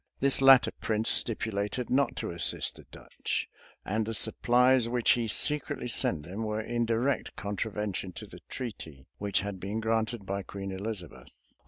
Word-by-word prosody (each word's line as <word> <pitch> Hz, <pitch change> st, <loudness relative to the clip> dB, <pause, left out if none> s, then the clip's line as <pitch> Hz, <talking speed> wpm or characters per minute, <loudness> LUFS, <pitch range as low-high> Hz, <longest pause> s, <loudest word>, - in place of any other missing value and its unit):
This 135 Hz, 0 st, +2 dB
latter 130 Hz, -4 st, +7 dB
prince 110 Hz, 0 st, +2 dB
stipulated 110 Hz, +1 st, +1 dB
not 135 Hz, 0 st, +2 dB
to -, -, -4 dB
assist 85 Hz, -, +1 dB
the -, -, -15 dB
Dutch; -, -, -4 dB, 0.4 s
and 110 Hz, +3 st, -1 dB
the 115 Hz, -, -1 dB
supplies 125 Hz, +2 st, +4 dB
which 120 Hz, -1 st, +2 dB
he 120 Hz, -2 st, +1 dB
secretly 145 Hz, +2 st, +1 dB
sent 85 Hz, -9 st, 0 dB
them 95 Hz, +8 st, -7 dB
were 110 Hz, -1 st, -2 dB
in 120 Hz, +1 st, -2 dB
direct 120 Hz, +4 st, -1 dB
contravention 105 Hz, -2 st, -4 dB
to -, -, -8 dB
the -, -, -13 dB
treaty.[*] 80 Hz, -, -7 dB
which 100 Hz, -1 st, 0 dB
had 100 Hz, -1 st, -5 dB
been 100 Hz, +4 st, -4 dB
granted 110 Hz, -1 st, -1 dB
by 100 Hz, +1 st, -3 dB
Queen 100 Hz, +1 st, -7 dB
Elizabeth. 95 Hz, -3 st, -7 dB
110 Hz, 160 wpm, -29 LUFS, 100-120 Hz, 0.4 s, latter